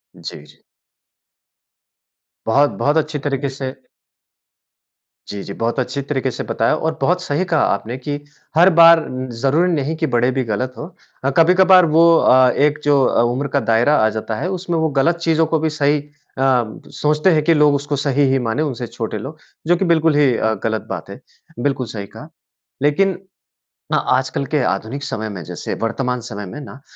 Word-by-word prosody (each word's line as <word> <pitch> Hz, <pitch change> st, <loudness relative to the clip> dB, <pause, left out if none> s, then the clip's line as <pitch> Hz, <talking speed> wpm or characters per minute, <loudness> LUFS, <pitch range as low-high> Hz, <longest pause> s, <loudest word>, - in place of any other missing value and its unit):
जी, 75 Hz, -, -9 dB
जी। 75 Hz, -, -21 dB, 1.9 s
बहुत-बहुत 145 Hz, +5 st, +2 dB
अच्छी 155 Hz, -1 st, -1 dB
तरीके 140 Hz, -1 st, -1 dB
से 135 Hz, -1 st, -5 dB, 1.6 s
जी, 100 Hz, -, -6 dB
जी। 100 Hz, -, -7 dB
बहुत 115 Hz, +5 st, -2 dB
अच्छी 130 Hz, +2 st, -3 dB
तरीके 135 Hz, -2 st, -2 dB
से -, -, -5 dB
बताया 115 Hz, +6 st, 0 dB
और 160 Hz, 0 st, -3 dB
बहुत 180 Hz, +1 st, +1 dB
सही 150 Hz, +5 st, -1 dB
कहा 165 Hz, -4 st, +1 dB
आपने 110 Hz, +5 st, -5 dB
कि 145 Hz, +2 st, -5 dB, 0.4 s
हर 175 Hz, +3 st, +6 dB
बार 165 Hz, 0 st, +8 dB
उम, 130 Hz, 0 st, -5 dB
ज़रूरी 140 Hz, +9 st, +1 dB
नहीं 155 Hz, 0 st, -1 dB
कि 160 Hz, 0 st, -2 dB
बड़े 120 Hz, +2 st, +2 dB
भी 130 Hz, 0 st, -1 dB
गलत 120 Hz, +4 st, -3 dB
हो, -, -, -6 dB, 0.4 s
अ, 135 Hz, -, +1 dB
कभी-कभार 185 Hz, +2 st, +6 dB
वो 160 Hz, +1 st, +4 dB, 0.2 s
अ, 130 Hz, 0 st, +5 dB
एक 150 Hz, +3 st, +1 dB
जो 145 Hz, -2 st, +3 dB
अ, -, -, +2 dB
उम्र 140 Hz, +3 st, -2 dB
का -, -, +4 dB
दायरा 120 Hz, +6 st, +3 dB
आ -, -, +3 dB
जाता 110 Hz, +1 st, -4 dB
है 175 Hz, +12 st, -3 dB
उसमें 180 Hz, -2 st, -3 dB
वो 160 Hz, 0 st, +1 dB
गलत 170 Hz, +5 st, +2 dB
चीज़ों 160 Hz, 0 st, +3 dB
को 160 Hz, 0 st, 0 dB
भी 160 Hz, +1 st, 0 dB
सही 150 Hz, -1 st, +1 dB
अ, 145 Hz, -, -14 dB, 0.9 s
सोचते 150 Hz, +4 st, +1 dB
हैं 155 Hz, -, +3 dB
कि 165 Hz, -, +3 dB
लोग 150 Hz, -2 st, +4 dB
उसको 145 Hz, +1 st, -2 dB
सही 140 Hz, 0 st, 0 dB
ही 135 Hz, -, +2 dB
माने 120 Hz, +7 st, -1 dB
उनसे 125 Hz, -5 st, -4 dB
छोटे 110 Hz, -1 st, -5 dB
लोग 135 Hz, +9 st, -8 dB, 0.3 s
जो 175 Hz, -, +4 dB
कि 190 Hz, -, -1 dB
बिल्कुल 165 Hz, -2 st, +2 dB
ही 140 Hz, -4 st, +3 dB
अ, 110 Hz, 0 st, 0 dB
गलत 110 Hz, -1 st, -2 dB
बात -, -, -6 dB
है, -, -, -9 dB, 0.4 s
बिल्कुल 130 Hz, -2 st, -1 dB
सही 105 Hz, -3 st, -6 dB
कहा। 150 Hz, +9 st, -12 dB, 0.5 s
लेकिन 180 Hz, +6 st, +1 dB, 0.8 s
हाँ -, -, +1 dB
आजकल 130 Hz, +1 st, -2 dB
के 150 Hz, -, +2 dB
आधुनिक 130 Hz, +6 st, -3 dB
समय 110 Hz, -6 st, -4 dB
में 95 Hz, -3 st, -7 dB
जैसे -, -, -5 dB
वर्तमान 125 Hz, +2 st, -2 dB
समय 105 Hz, -3 st, -7 dB
में 120 Hz, +11 st, -8 dB
ना 140 Hz, -1 st, -11 dB
145 Hz, 185 wpm, -18 LUFS, 125-160 Hz, 1.9 s, बार